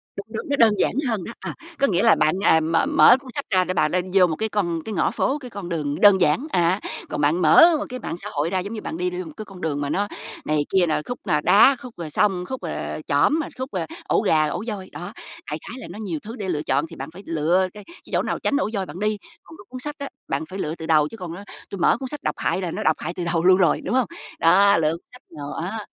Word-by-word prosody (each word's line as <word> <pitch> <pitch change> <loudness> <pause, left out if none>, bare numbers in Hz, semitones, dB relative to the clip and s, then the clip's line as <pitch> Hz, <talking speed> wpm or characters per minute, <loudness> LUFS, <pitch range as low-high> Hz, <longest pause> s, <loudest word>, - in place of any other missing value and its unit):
Đúng, 200 - -6
đúng, 225 +4 -6
nó 285 - +2
đơn 225 -2 +5
giản - - +2 0.2
hơn 210 -6 -1
đó, 230 - -7
à, - - -6 0.2
có 275 - +4
nghĩa 185 -1 +1
là 225 - +6
bạn, 155 - +2
à, 160 - +5
mờ 165 - +1
mở 290 -3 +7
cuốn 260 -2 -12
sách 285 - -3
ra 185 -3 +3
để 185 +1 -2
bà 160 - +2
lên 180 +2 -2
vô 190 -2 +6
một 160 - -2
cái 220 +6 -2
con 175 -6 -1
cái 220 - -4
ngõ - - +1
phố, 280 - 0
cái 255 - -9
con 200 -6 -7
đường 150 -4 -2
đơn 200 -3 +7
giản, 180 - +2
à, 175 +2 +2 0.3
còn 150 - -3
bạn 155 +5 +2
mở 330 - +7
một 300 - -3
cái 255 0 -6
mạng 170 - -5
xã 205 +3 -7
hội 150 +2 -1
ra 185 +1 0
giống 200 +5 -5
như 215 - -5
bạn - - -5
đi 180 +1 0
vô 180 0 -5
một 160 - -9
cái 215 - -6
con 185 -2 -13
đường 145 -3 -2
mà 140 - -2
nó 205 +6 0 0.4
này 155 0 +1
kia 190 -2 +3
là 155 - 0
khúc 245 - -5
là 150 -4 +2
đá, 220 - +6
khúc 245 -6 -11
là 160 -3 -5
sông, 185 +1 +1
khúc 260 -6 -5
là, 165 - -3 0.2
ờ, 155 - -6
chỏm, 145 - +3
rồi 310 - -3
khúc, 260 +1 -5
ờ, 180 -4 -2 0.2
ổ - - +2
gà, 155 -1 +3
ổ 150 - -3
voi. 195 -4 -5
Đó, 175 +4 -8 0.4
đại 150 - -2
khái 240 - -7
là - - -8
nó 210 - -9
nhiều 185 -8 -3
thứ 225 +3 -7
để 200 -6 -5
lựa 150 -4 -1
chọn 140 +2 +1
thì - - -10
bạn 135 +3 -7
phải 195 +3 -11
lựa 170 +4 +1
cái 210 - -11
cái 340 - -14 0.2
chỗ - - +3
nào - - -2
tránh 280 - +1
ổ 250 - 0
voi 195 -2 -1
bạn 175 +1 -9
đi. 210 +1 0 0.3
Còn 325 - -14
cái 205 - -14
cuốn 255 0 -7
sách 295 +3 -5
đó, 280 - -4 0.2
bạn - - -2
phải 190 +1 -6
lựa 155 -1 -2
từ 160 - -8
đầu 155 -2 +4
chứ 225 - -10
còn, 175 -4 -6
ơ, 200 - -9 0.3
tui 200 - -6
mở 170 - +4
cuốn 260 0 -5
sách 295 0 -7
độc - - -1
hại 190 - -1
là 175 -3 -3
nó - - -4
độc 160 - +3
hại 170 - -4
từ 180 -1 -4
đầu 170 -1 0
luôn 185 0 +7
rồi, 180 -3 +3
đúng 250 - -2
hông? 255 -6 +2 0.3
Đó, 195 +4 +5
lựa 155 -2 +2
cuốn 170 - -8
sách 250 +1 -15 0.2
nào, 145 0 -6
a, 205 +6 -4
185 Hz, 305 wpm, -23 LUFS, 165-220 Hz, 0.4 s, mở